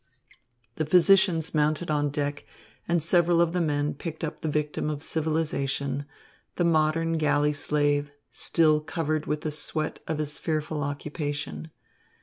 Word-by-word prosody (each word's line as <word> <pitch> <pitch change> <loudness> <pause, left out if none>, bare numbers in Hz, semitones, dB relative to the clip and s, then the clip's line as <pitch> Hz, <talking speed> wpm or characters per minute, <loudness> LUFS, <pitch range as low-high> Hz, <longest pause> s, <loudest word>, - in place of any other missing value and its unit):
The 155 - 0
physicians 180 -1 +4
mounted 155 +2 +1
on 145 -1 +1
deck, 145 0 -2 0.4
and 170 -2 +1
several 170 0 +3
of 170 -1 +3
the 180 - +1
men 150 -1 0
picked 160 +3 -7
up 155 - -3
the 160 - -4
victim 150 0 -1
of 150 -1 -4
civilisation, 145 -4 -1 0.5
the 175 - +1
modern 165 0 +2
galley 150 -1 +2
slave, 145 0 +1 0.2
still 155 -2 +2
covered 155 0 -2
with 150 0 -1
the 155 - -2
sweat 155 +1 -2
of 160 - -1
his 150 -1 -3
fearful 155 -1 -2
occupation. 145 - -4
155 Hz, 140 wpm, -27 LUFS, 145-160 Hz, 0.5 s, physicians